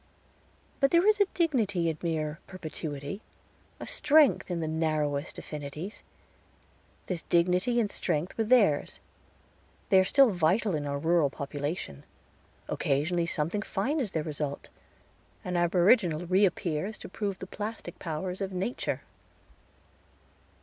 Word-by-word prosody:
But 275 - +4
there 340 +5 +4
is 425 -1 +4
a 400 - +5
dignity 225 - +1
in 160 - 0
mere 160 -2 -2
perpetuity, 155 -1 -6 0.6
a - - -6
strength 295 -6 +4
in 175 -1 -2
the 160 - -2
narrowest 155 -2 -1
affinities. 150 +6 -6 1.0
This 180 -3 -3
dignity 180 +7 +2
and 225 - +2
strength 170 -4 -2
were 225 - +1
theirs. 215 - +3 0.9
They 190 - +7
are - - +5
still 265 +5 +5
vital 185 +4 +2
in 145 -2 -2
our 140 0 -1
rural 160 0 +2
population. 140 - -5 0.6
Occasionally 170 +5 0
something 165 +6 -1
fine 220 +10 -1
is 245 -7 -1
their 160 -4 -2
result; 150 -2 -4 0.8
an 180 -1 -2
aboriginal 175 0 +3
reappears 185 0 +1
to - - -9
prove 200 -3 -3
the - - -7
plastic 210 +3 -6
powers 180 +3 -4
of 195 -1 -2
nature. 190 +7 -2
175 Hz, 130 wpm, -29 LUFS, 155-205 Hz, 1.0 s, They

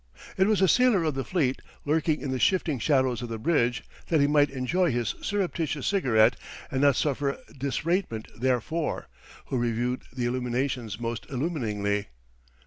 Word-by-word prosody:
It 190 +1 +3
was 210 -3 +3
a - - +6
sailor 250 -5 +4
of 155 -2 0
the 135 0 -2
fleet, 140 -7 0 0.2
lurking 155 +1 +1
in 135 - -3
the 130 - -1
shifting 165 -6 +2
shadows 130 -3 +2
of 120 - -5
the 115 - -3
bridge, 120 -1 +1 0.2
that 160 - +2
he 140 - +5
might 145 0 +4
enjoy 150 +7 0
his 120 -2 -1
surreptitious 170 -8 -1
cigarette 125 - +3 0.3
and 130 - 0
not 140 -2 +5
suffer 140 0 0 0.2
disratement 140 - -1
therefor, 130 - -1 0.4
who 130 - -2
reviewed 120 +2 -1
the 125 0 -3
illuminations 125 -2 -2
most 115 0 -4
illuminingly. 110 -9 -1
135 Hz, 155 wpm, -27 LUFS, 120-160 Hz, 0.4 s, a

